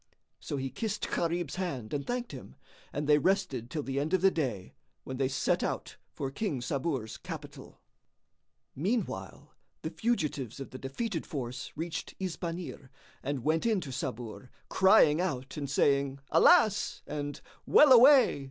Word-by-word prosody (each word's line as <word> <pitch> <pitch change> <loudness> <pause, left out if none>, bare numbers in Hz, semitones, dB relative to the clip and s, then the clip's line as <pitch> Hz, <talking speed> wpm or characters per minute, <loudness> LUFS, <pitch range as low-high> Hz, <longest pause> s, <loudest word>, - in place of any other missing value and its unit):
So 145 - -4
he 135 -1 -3
kissed 210 -2 -3
Gharib's 170 -1 -1
hand 145 -12 -4
and 140 -1 -3
thanked 245 -1 -3
him, 125 - -10 0.4
and 145 +1 -3
they 150 0 +5
rested 165 - 0
till 150 0 -3
the 135 0 -2
end 155 +6 +1
of 185 - 0
the 195 0 +5
day, 120 - -3 0.3
when 130 - -6
they 135 0 +1
set 135 0 0
out - - -3
for 135 -1 -4
King 180 - -2
Sabur's 130 -2 -3
capital. - - -9 1.0
Meanwhile, 165 - -3 0.3
the 160 - -3
fugitives 150 - -2
of 135 - -7
the 130 - -8
defeated 165 - -4
force 125 -4 -5
reached 165 +1 -5
Isbanir 175 -6 -5 0.3
and 140 -2 -3
went 160 +3 +1
in 220 -4 +2
to 140 - -7
Sabur, 120 0 -5 0.2
crying 185 -5 +5
out 135 -8 -3
and 140 -2 -4
saying, 140 -1 +2
"Alas!" 220 - +4
and 145 -1 -4 0.3
"Well 295 -2 +7
away!" 255 - +7
150 Hz, 150 wpm, -30 LUFS, 135-185 Hz, 1.0 s, Well